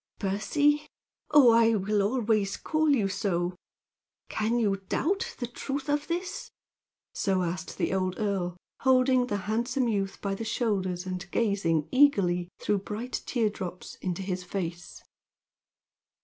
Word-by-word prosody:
"Percy! 290 +10 +1 0.4
Oh, 285 -5 +7
I 230 0 +5
will 205 +1 +1
always 215 -2 +1
call 310 0 +1
you 240 -9 +3
so! 185 -3 -1 0.8
Can 220 +2 0
you 205 -4 +2
doubt 385 +6 0
the 245 - -2
truth 270 +3 -5
of 295 0 0
this?" 355 +2 -3 0.6
So 190 -2 +1
asked 175 0 -4
the - - 0
old 185 -1 0
earl, 190 -5 -1 0.2
holding 255 -1 +4
the 205 - -1
handsome 240 +4 0
youth 200 -3 -1
by 200 -1 -2
the 195 - -4
shoulders 195 -6 -1
and 185 -1 -5
gazing 175 -8 +1
eagerly, 195 -11 +3
through 205 - +1
bright 215 +5 -4
tear 225 -4 +1
drops, 180 -3 -7
into 185 0 -2
his 185 -1 -3
face. 175 -2 -5
210 Hz, 135 wpm, -28 LUFS, 185-250 Hz, 0.8 s, Oh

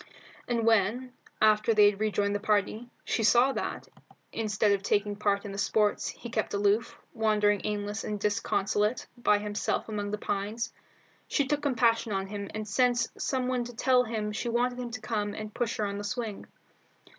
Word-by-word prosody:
And 235 -2 0
when, 230 +3 +2 0.3
after 215 +1 +4
they 205 -1 +7
had 200 - -12
rejoined 205 -1 +1
the 205 - 0
party, 215 +3 0 0.2
she - - 0
saw 240 +5 +5
that, - - -4 0.4
instead 215 -1 +1
of 200 -1 +2
taking 205 0 0
part 200 -1 0
in 200 - -5
the 200 - -5
sports, 210 +1 +1
he 235 - -7
kept 220 -2 -1
aloof, 205 +3 +1 0.2
wandering 210 -3 +2
aimless 210 +1 -2
and 210 -1 -3
disconsolate 210 +2 0
by 225 -4 +3
himself 205 0 -2
among 205 -1 -3
the 210 - -2
pines, 210 +3 -3 0.5
she 285 - +1
took 290 +2 0
compassion 230 -5 +2
on 195 0 -1
him 200 0 -6
and 215 0 -4
sent 245 +3 +2
some 260 -2 -1
one 250 -1 0
to 240 0 -9
tell 250 +1 +4
him 220 -3 -3
she 235 +3 -3
wanted 245 +1 0
him 245 -1 -4
to 230 -2 -6
come 210 -2 -2
and 215 0 -6
push 240 -2 -2
her 215 - 0
in 200 0 -3
the - - -5
swing. 220 -1 -4
215 Hz, 185 wpm, -29 LUFS, 205-235 Hz, 0.5 s, they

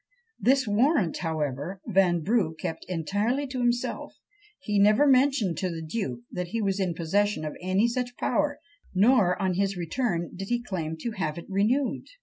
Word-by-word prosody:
This 265 0 +3
warrant, 215 - +2
however, 155 +1 -3
Vanbrugh 185 -2 +2
kept 165 - -4
entirely 205 - -1
to 260 -1 -5
himself; 240 0 -1 0.4
he 210 -7 0
never 210 +7 +5
mentioned 260 - +3
to 185 - -1
the 165 -2 -5
duke 155 - -3
that 180 0 -3
he 230 +6 -3
was 200 -2 0
in 180 -3 0
possession 185 +1 0
of 150 - -5
any 190 +5 +2
such 245 0 -3
power; 295 -1 0 0.4
nor, 195 -3 +4
on 185 -1 +1
his 195 +1 0
return, 175 -1 -2
did 195 +1 -6
he 240 0 +1
claim 160 -7 -4
to 235 - -2
have 165 -7 -3
it 170 - -7
renewed. 215 +8 0
195 Hz, 165 wpm, -27 LUFS, 175-240 Hz, 0.4 s, never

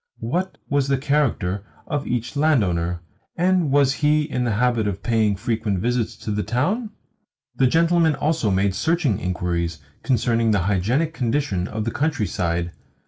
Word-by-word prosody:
What 175 +12 -2
was 140 -1 +1
the 135 0 +2
character 130 -9 0 0.2
of 145 -3 -3
each 120 +3 -2
landowner, 90 - +1 0.3
and 180 -2 +2
was 140 -1 +4
he 150 +1 +2
in 125 -4 -2
the 115 - 0
habit 115 -1 +1
of 100 -1 -4
paying 110 -3 +2
frequent 105 -1 -1
visits 120 +3 -1
to 105 - -2
the 105 0 0
town? 175 - -1 0.7
The 130 - +4
gentleman 165 +1 +3
also 145 -4 0
made 95 0 +1
searching 160 - +1
inquiries 85 -2 -2 0.2
concerning 115 -3 +1
the 105 -4 +2
hygienic 105 - 0
condition 115 - -1
of 110 0 -4
the 115 - -1
countryside. 90 - -1
120 Hz, 150 wpm, -22 LUFS, 100-150 Hz, 0.7 s, was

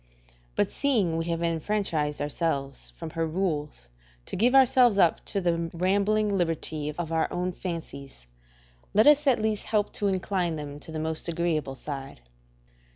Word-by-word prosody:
But - - +1
seeing 220 - +1
we 165 0 -1
have 170 0 -2
enfranchised 165 -3 -1
ourselves 140 -2 -2
from 165 -1 -6
her 165 0 -1
rules 155 - -2 0.4
to - - -5
give 245 +7 +3
ourselves 250 -4 +6
up 175 -4 +3
to 200 - -1
the 170 -2 0
rambling 200 +4 +2
liberty 160 -4 -1
of 170 -2 -3
our 160 -1 +1
own 180 +1 -1
fancies, 155 - -7 0.7
let 215 +2 +6
us 295 0 +6
at 255 -4 +4
least 215 -1 -1
help 210 -2 0
to 205 - -1
incline 185 -3 0
them 145 -1 -7
to 160 - -10
the 160 - -4
most 160 +1 -2
agreeable 160 -5 -1
side. 135 - -7
170 Hz, 155 wpm, -27 LUFS, 155-200 Hz, 0.7 s, ourselves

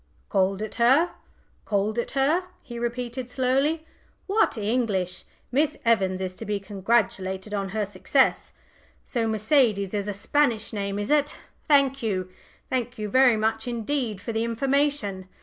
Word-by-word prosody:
"Called 195 +1 +1
it 215 - -5
her? 275 +9 +5 0.5
called 210 +2 0
it - - -2
her?" 310 +7 +2 0.2
he 235 -1 -7
repeated 240 +1 -3
slowly. 275 +5 +1 0.4
"What 405 - +2
English! 205 -5 -1 0.3
Miss 295 +4 +1
Evans 190 -5 +2
is 185 -1 -4
to - - -6
be 205 -1 -1
congratulated 195 -1 -1
on 195 -1 -2
her 210 +1 -1
success! 205 +7 +1 0.5
So 235 -3 -1
Mercedes 220 -3 +2
is 205 -1 -2
a 205 - -2
Spanish 230 +1 0
name, 200 -1 -2
is 205 +6 -2
it? 295 -1 +2 0.3
Thank 275 -3 +4
you 185 -5 -2 0.4
thank 245 -1 -2
you 210 -1 -4
very 255 0 +5
much 220 +1 -1
indeed 235 -2 -2
for 205 +3 -5
the 220 +1 0
information. 235 -5 0
225 Hz, 150 wpm, -25 LUFS, 200-260 Hz, 0.5 s, her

